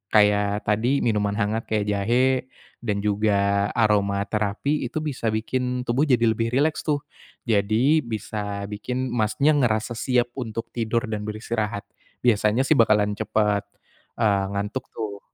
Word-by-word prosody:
kayak 105 0 +3
tadi 115 +7 +1
minuman 105 -3 +1
hangat 110 +2 -1
kayak 105 -2 0
jahe 125 +6 +1 0.3
dan 105 -4 -2
juga 100 -1 +2
aroma 100 -3 +2
terapi 110 +7 -1
itu 155 +5 -4
bisa 135 -6 -3
bikin 125 +3 -1
tubuh 130 +5 +1
jadi 125 -4 +3
lebih 115 +1 -1
rileks 155 +3 +2
tuh. 145 -1 0 0.4
Jadi 115 +7 +3
bisa 105 -3 -4
bikin 125 +4 -3
Masnya 110 +5 +2
ngerasa 110 -3 +1
siap 120 +1 0
untuk 115 -1 -5
tidur 115 0 0
dan 105 0 -3
beristirahat. 110 0 -3 0.4
Biasanya 110 +1 +3
sih 155 - +4
bakalan 105 -2 +4
cepat, 105 0 0 0.5
eee, 100 -4 +2
ngantuk 105 +6 -3
tuh. 105 -3 -4
110 Hz, 135 wpm, -24 LUFS, 105-125 Hz, 0.5 s, sih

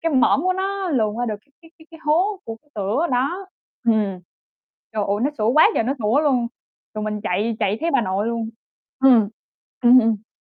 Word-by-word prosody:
cái 330 -2 0
mõm 260 +3 +3
của 370 +1 +2
nó 385 0 -2
luồn 220 -9 0
qua 245 0 -1
được 215 - -2 0.3
cái 325 - -17
cái 315 - -18
cái 325 -1 -14
hố 365 +7 +1
của 225 - -6
cái 295 - -34
cửa 210 - 0
đó. 285 +10 -1 0.4
Ừm. 215 -5 +1 0.8
Trời 215 -2 0
ơi, 200 +1 +1
nó 280 - +2
sủa 215 +1 +1
quá 315 +9 +6
trời - - +2
nó 255 +4 0
sủa 225 +6 +2
luôn, 255 -6 +1 0.5
rồi 215 0 -4
mình 210 -1 -3
chạy, 215 +3 -1
chạy 200 +2 0
thấy 335 +1 0
bà 275 -3 +3
nội 195 +2 -1
luôn. 230 -1 -2 0.5
Ừm. 250 -6 +5 0.6
Ừm, 245 +1 +8
ừm. 220 -2 0
240 Hz, 210 wpm, -21 LUFS, 215-310 Hz, 0.8 s, Ừm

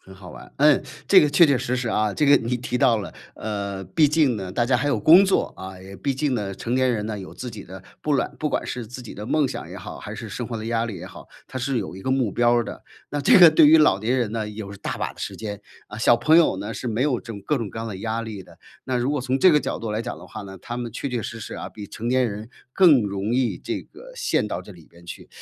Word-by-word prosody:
很 95 - -15
好 95 -2 -12
玩。 - - -13
嗯， 150 -1 +4 0.2
这 190 -2 +7
个 150 - +2
确 170 +3 +6
确 140 - +3
实 125 +1 -2
实 125 -2 -2
啊， 105 -1 +1
这 150 - 0
个 140 - +7
你 120 +2 -1
提 125 0 -3
到 120 -2 +4
了， 100 - -7 0.2
呃， 100 -3 -4
毕 145 - +3
竟 150 -6 +2
呢， 95 -2 -5
大 120 +5 0
家 125 0 +3
还 140 +4 -1
有 120 -6 +1
工 170 - +7
作， 190 - +1
啊。 95 0 -8
也 95 +1 -11
毕 140 - -2
竟 145 +1 -1
呢， 100 -4 -3
成 120 +5 -3
年 130 -1 +3
人 105 -3 -2
呢， 110 -1 -4
有 95 - -9
自 125 - -6
己 110 -3 -9
的 95 +1 -11 0.2
不 150 - 0
管 - - -2
不 155 - -1
管 - - -1
是 120 -3 -5
自 125 +3 -9
己 115 - -10
的 105 +2 -7
梦 150 +2 +2
想 - - -6
也 - - -9
好， - - -8
还 - - -8
是 - - -7
生 - - -5
活 120 - -5
的 110 0 -6
压 115 0 0
力 105 - -6
也 - - -8
好， - - -12 0.2
它 130 - -5
是 130 +1 -1
有 95 -5 -5
一 - - -9
个 130 - -3
目 130 -5 +1
标 120 0 +3
儿 120 - +2
的。 - - -8 0.3
那 145 - -2
这 - - +6
个 175 -3 +10
对 155 -1 +6
于 160 +2 +7
老 150 -11 +4
年 120 +5 0
人 120 -5 0
呢， 110 -2 -3
有 105 -1 -7
大 - - -5
把 - - -3
的 - - -23
时 - - -5
间。 105 -2 -6 0.3
啊， 105 - -8
小 120 +1 +5
朋 155 +7 +4
友 165 - +4
呢， 105 +4 -5
是 - - -6
没 115 +2 0
有 135 -4 +1
这 115 - -8
种 100 -2 -9
各 150 -3 0
种 115 - -4
各 - - -8
样 115 - -4
的 100 - -6
压 115 +2 -2
力 110 -4 -7
的， - - -18 0.3
那 130 -1 -1
如 125 +3 0
果 145 -3 -1
从 130 +1 -1
这 185 - +6
个 150 - +5
角 - - -3
度 115 - -5
来 105 +1 -1
讲 120 - -5
的 - - -12
话 110 - -8
呢， 95 -1 -9
他 120 - -6
们 120 -1 -4
确 140 +4 -4
确 120 -3 -3
实 115 - -6
实 - - -7
啊， - - -6
比 105 -2 -9
成 115 - -7
年 130 -1 +2
人 105 +3 -7 0.2
更 160 -10 +6
容 100 +3 -2
易 130 -2 0
这 - - -4
个 - - -14
陷 480 - 0
到 90 -4 -4
这 105 - -13
里 85 -3 -16
边 85 0 -19
去。 - - -9
120 Hz, 325 characters per minute, -23 LUFS, 105-135 Hz, 0.3 s, 个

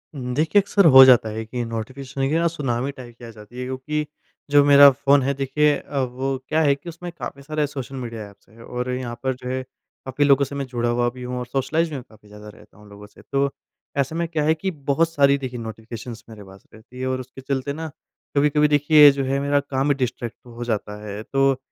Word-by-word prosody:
उम, 125 -2 -4
देखिए 160 +7 +3
अक्सर 200 -1 +2
हो 130 0 +11
जाता 125 -4 +5
है 110 +1 -5
कि 120 +2 -4
नोटिफ़िकेशन 130 +4 -6
की 155 - 0
ना 170 +1 +2
सुनामी 135 -5 -2
टाइप 125 -4 -12
की 120 - -11
आ - - -9
जाती 110 +3 -13
है, - - -3
क्योंकि 130 +4 -3 0.5
जो 145 0 +6
मेरा 145 0 +9
फ़ोन 140 +1 +3
है 140 +2 0
देखिए 140 +2 +1
अ, 140 - -5
वो 130 +1 -2
क्या 155 +1 +2
है 145 -3 +4
कि 155 +5 -10
उसमें 175 +1 -8
काफ़ी 135 +2 -7
सारे 150 +1 -2
सोशल 135 -1 -7
मीड़िया 115 -5 -6
एप्स 100 0 -23
हैं, 115 +1 -17
और 125 +2 -5
यहाँ 125 -2 -4
पर 130 0 0
जो 125 0 -8
है, 130 0 -2 0.4
काफ़ी 130 +2 0
लोगों 140 0 +4
से 140 - -8
मैं 140 -1 -3
जुड़ा 120 -1 -2
हुआ 120 0 +1
भी 125 +1 -10
हूँ 125 0 -4
और 125 - -4
सोशलाइज़ 145 +7 -1
भी 155 - -6
मैं 130 - -6
काफ़ी 105 -1 -20
ज़्यादा 105 +1 -12
रहता 105 - -18
हूँ 105 0 -17
लोगों 100 0 -12
से। - - -19
तो, 140 0 -1 0.5
ऐसे 140 +3 0
में 170 0 -1
क्या 160 -2 -2
है 155 +1 +3
कि 190 +4 -3 0.2
बहुत 165 +4 +3
सारी 140 -3 +3
देखिए 125 -3 -6
नोटिफ़िकेशंस 115 +1 -8
मेरे 110 -2 -11
पास 95 0 -16
रहती 115 +3 -14
है 130 - -2
और 130 0 -1
उसके 130 +1 -10
चलते 135 +1 -3
ना 160 +1 -5 0.5
कभी-कभी 150 +1 +3
देखिए 150 0 +7
जो 140 0 -3
है 135 +1 0
मेरा 140 +1 +1
काम 135 0 -2
ही 145 - +4
डिस्ट्रैक्ट 125 -3 -3
हो 120 0 -8
जाता 105 -3 -3
है। 105 0 -6
तो, 135 +1 +1
130 Hz, 240 wpm, -22 LUFS, 120-145 Hz, 0.5 s, हो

